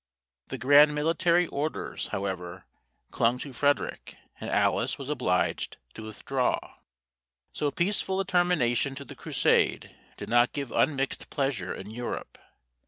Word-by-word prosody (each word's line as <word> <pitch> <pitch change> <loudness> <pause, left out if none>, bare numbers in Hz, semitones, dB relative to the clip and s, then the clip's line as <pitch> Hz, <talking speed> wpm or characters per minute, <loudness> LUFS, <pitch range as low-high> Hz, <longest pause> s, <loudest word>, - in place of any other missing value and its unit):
The - - -5
grand 145 +3 +6
military 170 +3 +2
orders, 155 0 -3
however, 95 -2 -4 0.5
clung 120 +2 +2
to 135 +1 -7
Frederic, 145 +3 -1 0.2
and - - -5
Alice - - +1
was 140 0 -7
obliged 120 -11 0 0.2
to - - -9
withdraw. 125 +4 -1 1.0
So 150 - 0
peaceful 190 +3 0
a 195 - 0
termination 155 -8 +2
to 140 +1 -8
the - - -9
Crusade - - +1 0.2
did - - -7
not 120 +1 +3
give 140 -5 -4
unmixed 135 -3 0
pleasure 135 -9 -1
in 100 +3 -7
Europe. 120 +2 -6
140 Hz, 130 wpm, -28 LUFS, 120-150 Hz, 1.0 s, grand